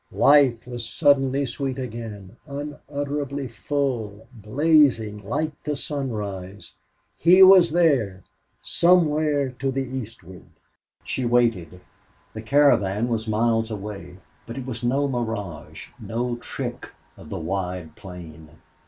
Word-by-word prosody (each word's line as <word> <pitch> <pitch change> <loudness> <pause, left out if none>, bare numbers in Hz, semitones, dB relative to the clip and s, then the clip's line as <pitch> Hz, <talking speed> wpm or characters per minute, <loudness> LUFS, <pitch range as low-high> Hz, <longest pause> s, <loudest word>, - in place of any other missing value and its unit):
Life 140 -5 +4
was 120 -1 -6
suddenly 135 +2 +2
sweet 130 +1 -4
again, 110 -5 -7
unutterably 145 -1 -4
full, 115 -4 -3
blazing 120 -2 +2
like 150 +9 -2
the 150 -1 -3
sunrise. 105 -10 -5 0.5
He 185 +3 +7
was 185 -2 +8
there 135 - +1 0.4
somewhere 155 -5 +2
to 135 +1 -1
the 135 0 -1
eastward. 110 -8 -8 0.6
She 130 - -3
waited. 115 -8 +1 0.5
The 110 - -6
caravan 115 -4 +3
was 115 -1 -2
miles 115 +1 +1
away. 100 -4 -7 0.3
But 115 - -7
it 130 - -5
was 120 -2 -6
no 135 +4 +1
mirage, 110 - -5
no 120 +2 -3
trick - - -6 0.3
of - - -14
the - - -4
wide 90 -4 -4
plain! 85 -6 -11
120 Hz, 115 wpm, -23 LUFS, 105-140 Hz, 0.6 s, was